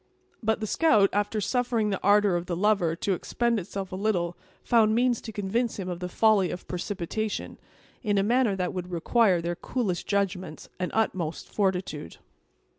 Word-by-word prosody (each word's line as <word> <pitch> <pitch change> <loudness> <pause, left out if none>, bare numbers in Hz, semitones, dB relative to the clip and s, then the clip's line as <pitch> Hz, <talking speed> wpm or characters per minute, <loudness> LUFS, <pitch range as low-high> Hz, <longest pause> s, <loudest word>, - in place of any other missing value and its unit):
But 220 -1 0
the - - -1
scout, 215 -5 +4
after 205 +1 0
suffering 230 0 0
the 195 - -1
ardor 205 -1 +4
of 175 0 -2
the 175 - -1
lover 185 -4 +2
to 195 +3 -1
expend 235 +5 0
itself 195 +1 -6
a - - -4
little, 185 -4 0 0.3
found 220 -2 +4
means 245 0 +2
to 225 - -7
convince 220 +4 -1
him 190 -3 -4
of 175 -1 -4
the 180 0 -4
folly 205 -2 +3
of 180 - -7
precipitation, 200 +3 -4 0.4
in 205 -4 0
a 195 - +3
manner 235 -1 +2
that 180 -1 -2
would 180 -1 -5
require 185 +2 +2
their 175 +1 -2
coolest 200 -4 -2
judgment 185 -5 -2
and 180 - -1
utmost 180 -7 -1
fortitude. 185 - -1
200 Hz, 175 wpm, -27 LUFS, 180-220 Hz, 0.4 s, scout